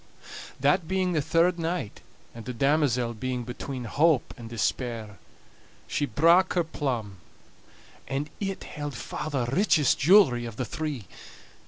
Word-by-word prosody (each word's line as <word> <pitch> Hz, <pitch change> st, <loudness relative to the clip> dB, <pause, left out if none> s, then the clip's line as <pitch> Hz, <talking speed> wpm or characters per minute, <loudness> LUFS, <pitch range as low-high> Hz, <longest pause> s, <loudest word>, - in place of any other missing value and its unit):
That 145 Hz, +5 st, +2 dB
being 185 Hz, 0 st, 0 dB
the 155 Hz, -, +1 dB
third 170 Hz, +3 st, +2 dB
night, 165 Hz, -, -3 dB, 0.3 s
and 115 Hz, -1 st, -10 dB
the 125 Hz, -, -5 dB
damosel 130 Hz, -3 st, +2 dB
being 125 Hz, +2 st, -3 dB
between 125 Hz, +2 st, -6 dB
hope 150 Hz, +4 st, +2 dB
and 115 Hz, -2 st, -10 dB
despair, 115 Hz, -3 st, -3 dB, 0.7 s
she 145 Hz, -, -1 dB
brak 170 Hz, -, +4 dB
her 175 Hz, -, +2 dB
plum, 125 Hz, -11 st, -3 dB, 0.9 s
and 145 Hz, +3 st, -3 dB
it 195 Hz, -2 st, -3 dB
held 145 Hz, -2 st, -6 dB
far 150 Hz, +5 st, -5 dB
the 135 Hz, -5 st, -1 dB
richest 150 Hz, -, +2 dB
jewelry 140 Hz, -7 st, +5 dB
of 115 Hz, -2 st, -7 dB
the 125 Hz, -, -3 dB
three. 150 Hz, -6 st, -4 dB
140 Hz, 140 wpm, -27 LUFS, 120-165 Hz, 0.9 s, jewelry